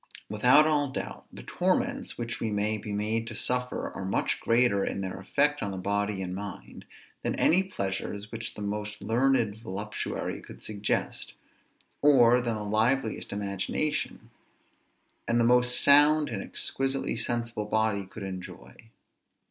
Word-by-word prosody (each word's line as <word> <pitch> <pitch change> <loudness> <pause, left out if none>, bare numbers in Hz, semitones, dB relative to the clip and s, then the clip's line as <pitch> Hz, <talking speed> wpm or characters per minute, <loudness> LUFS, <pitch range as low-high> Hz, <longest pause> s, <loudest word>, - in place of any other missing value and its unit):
Without 125 +8 +5
all 145 -2 +2
doubt, 130 - -6
the - - -10
torments - - -1
which 115 -1 -4
we 115 - -1
may 105 +1 0
be 105 - -7
made 110 +2 -1
to 115 - -6
suffer 125 +1 -1
are - - -6
much 95 - 0
greater 115 -4 +3
in 100 - -2
their 95 0 -4
effect 145 +9 +1
on 100 - -2
the 95 - -5
body 100 +1 -1
and 90 -1 -4
mind, 100 0 -8 0.4
than - - -1
any 180 +3 +4
pleasures 100 - -4
which 115 0 -5
the 105 - -6
most 105 +1 -4
learned 120 -3 +2
voluptuary 105 -1 -4
could - - -13
suggest, 105 -1 -2 0.7
or 125 -4 +6
than 120 -2 -1
the 105 - -4
liveliest 110 +3 0
imagination, 100 +9 -2 1.0
and 120 0 +2
the - - +4
most 125 +1 +4
sound 150 +1 +6
and - - -3
exquisitely 135 0 0
sensible 120 -2 -2
body, 110 -1 +1
could 100 +2 -9
enjoy. 95 -1 -8
110 Hz, 150 wpm, -28 LUFS, 100-125 Hz, 1.0 s, or